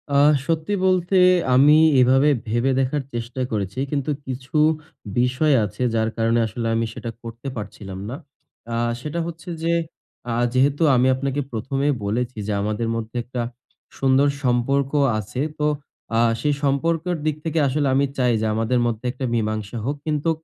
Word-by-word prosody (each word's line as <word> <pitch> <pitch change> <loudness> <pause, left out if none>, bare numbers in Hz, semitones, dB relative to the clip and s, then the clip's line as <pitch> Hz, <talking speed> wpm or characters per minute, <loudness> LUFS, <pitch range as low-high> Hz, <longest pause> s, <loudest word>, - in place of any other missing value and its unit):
আহ 145 +2 +6 0.2
সত্যি 165 +4 0
বলতে, 185 0 +2 0.4
আমি 145 +4 +7 0.2
এভাবে 135 +3 +5 0.2
ভেবে 120 +4 +1
দেখার 135 +2 0
চেষ্টা 120 +2 -4
করেছি, 100 +2 -3
কিন্তু, 145 0 -1 0.2
কিছু 130 +2 -7 0.6
বিষয় 125 +4 +2
আছে, 105 +4 -8
যার 110 0 +1
কারণে 115 +1 +2
আসলে 115 +2 -4
আমি 115 0 +1
সেটা 115 - -6
করতে 115 +3 -8
পারছিলাম 100 -3 -7
না। 130 - -4 0.6
আহ 120 0 0
সেটা 155 +5 -4
হচ্ছে 170 +2 -8
যে, 165 - +1 0.6
আহ 120 +1 +1
যেহেতু 140 +4 +2
আমি 125 +1 +4
আপনাকে 140 +1 -2
১ম 120 +4 -3
এ - - +4 0.2
বলেছি 120 +3 -2
যে, - - -1
আমাদের 105 +2 -1
মধ্যে 115 +1 -5
একটা 125 +1 -4 0.6
সুন্দর 135 +1 +4 0.2
সম্পর্ক 130 +3 +1 0.3
আছে। 110 +4 -6 0.2
তো 150 - +1 0.5
আহ 115 0 +4
সেই 150 -1 +2
সম্পর্কের 165 +5 0
দিক 155 -2 +1
থেকে 160 0 0
আসলে 140 +1 0
আমি 140 +1 +3
চাই 125 -2 +3
যে, - - 0
আমাদের 115 +3 +1
মধ্যে 115 0 -2
একটা 130 +1 -4
মীমাংসা 110 -1 -2
হোক। 140 +3 -1
কিন্তু 155 +1 0
130 Hz, 160 wpm, -22 LUFS, 115-145 Hz, 0.6 s, আমি